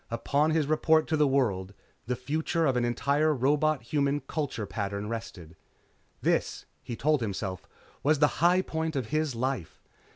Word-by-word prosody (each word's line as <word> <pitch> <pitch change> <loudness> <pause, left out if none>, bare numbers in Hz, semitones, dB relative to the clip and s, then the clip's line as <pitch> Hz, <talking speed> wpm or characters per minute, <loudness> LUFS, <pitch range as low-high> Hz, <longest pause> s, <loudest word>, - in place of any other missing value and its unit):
Upon 140 +6 +1
his 160 -1 +2
report 155 +1 +3
to 160 - +2
the 150 -1 +3
world, 100 -8 0 0.3
the 125 - 0
future 160 +5 -1
of 135 -3 +2
an 125 - +1
entire 145 +6 +1
robot 145 +2 +1
human 140 +3 0
culture 145 -8 -3
pattern 100 0 -4
rested. 90 -8 -7 0.7
This, - - 0 0.2
he 120 - -6
told 150 +2 +1
himself, 95 -3 -4 0.3
was 150 +2 +3
the 150 0 +1
high 180 +2 +4
point 160 -2 -3
of 130 -5 -2
his 155 -4 0
life. 125 -8 -3
140 Hz, 160 wpm, -28 LUFS, 115-155 Hz, 0.7 s, high